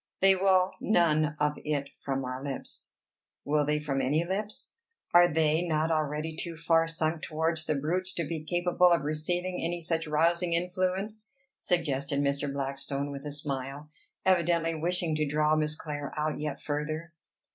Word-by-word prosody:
They 195 Hz, 0 st, +6 dB
will 185 Hz, -1 st, +3 dB
none 155 Hz, -6 st, +3 dB
of 150 Hz, 0 st, +1 dB
it 145 Hz, -2 st, -1 dB
from 135 Hz, -1 st, -2 dB
our 130 Hz, +1 st, -5 dB
lips." 140 Hz, -2 st, -6 dB, 0.5 s
"Will 150 Hz, +1 st, +2 dB
they 150 Hz, 0 st, +2 dB
from 140 Hz, -2 st, -1 dB
any 145 Hz, +5 st, +2 dB
lips? 205 Hz, -, -4 dB, 0.4 s
Are 175 Hz, 0 st, +8 dB
they 160 Hz, -1 st, +2 dB
not 160 Hz, -2 st, 0 dB
already 155 Hz, 0 st, -1 dB
too 165 Hz, 0 st, -5 dB
far 165 Hz, -1 st, +3 dB
sunk 160 Hz, 0 st, -1 dB
towards 160 Hz, 0 st, -1 dB
the 155 Hz, -, +1 dB
brutes 180 Hz, +6 st, -1 dB
to 170 Hz, -, -1 dB
be 160 Hz, -1 st, -4 dB
capable 175 Hz, +2 st, +3 dB
of 170 Hz, -4 st, +3 dB
receiving 175 Hz, +5 st, -1 dB
any 175 Hz, +1 st, -1 dB
such 165 Hz, -1 st, -1 dB
rousing 170 Hz, +3 st, +2 dB
influence?" 185 Hz, +5 st, -1 dB, 0.3 s
suggested 140 Hz, -5 st, 0 dB
Mr. 140 Hz, 0 st, 0 dB
Blackstone 140 Hz, +1 st, -3 dB
with 140 Hz, +1 st, -6 dB
a -, -, -4 dB
smile, 140 Hz, 0 st, -5 dB, 0.3 s
evidently 170 Hz, -2 st, +3 dB
wishing 170 Hz, 0 st, 0 dB
to 155 Hz, -1 st, +1 dB
draw 150 Hz, +1 st, +2 dB
Miss 155 Hz, 0 st, +1 dB
Clare 145 Hz, -2 st, -5 dB
out 150 Hz, 0 st, -1 dB
yet 150 Hz, -2 st, -3 dB
further. 155 Hz, +3 st, -3 dB
155 Hz, 160 wpm, -29 LUFS, 150-175 Hz, 0.5 s, Are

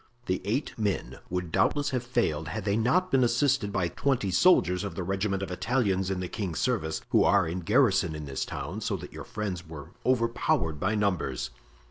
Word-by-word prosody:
"The 95 Hz, -, -1 dB
eight 120 Hz, +9 st, -1 dB
men 105 Hz, -3 st, -2 dB
would 90 Hz, -2 st, -3 dB
doubtless 145 Hz, -, +2 dB
have 125 Hz, -2 st, 0 dB
failed 120 Hz, -11 st, -1 dB
had 105 Hz, +3 st, -4 dB
they 100 Hz, -1 st, +2 dB
not 165 Hz, +12 st, +2 dB
been 135 Hz, -1 st, +4 dB
assisted 125 Hz, -2 st, +2 dB
by 95 Hz, -3 st, 0 dB
twenty 120 Hz, -1 st, 0 dB
soldiers 90 Hz, -, +4 dB
of 100 Hz, -, -5 dB
the 95 Hz, -, -3 dB
regiment 95 Hz, +1 st, -1 dB
of 95 Hz, -, -5 dB
Italians 95 Hz, -2 st, 0 dB
in 95 Hz, -1 st, -2 dB
the 90 Hz, -, -3 dB
king's 90 Hz, -4 st, -4 dB
service, 80 Hz, -11 st, 0 dB
who -, -, +5 dB
are 100 Hz, -4 st, +4 dB
in 85 Hz, +3 st, -3 dB
garrison 100 Hz, -, +3 dB
in 75 Hz, -1 st, -6 dB
this 70 Hz, -2 st, -3 dB
town 95 Hz, +10 st, -5 dB
so 105 Hz, -2 st, -1 dB
that -, -, -10 dB
your -, -, -8 dB
friends 95 Hz, -5 st, -4 dB
were 75 Hz, -3 st, -9 dB
overpowered 115 Hz, -, +1 dB
by 100 Hz, +6 st, 0 dB
numbers." 95 Hz, -, -1 dB
100 Hz, 195 wpm, -28 LUFS, 90-120 Hz, -, who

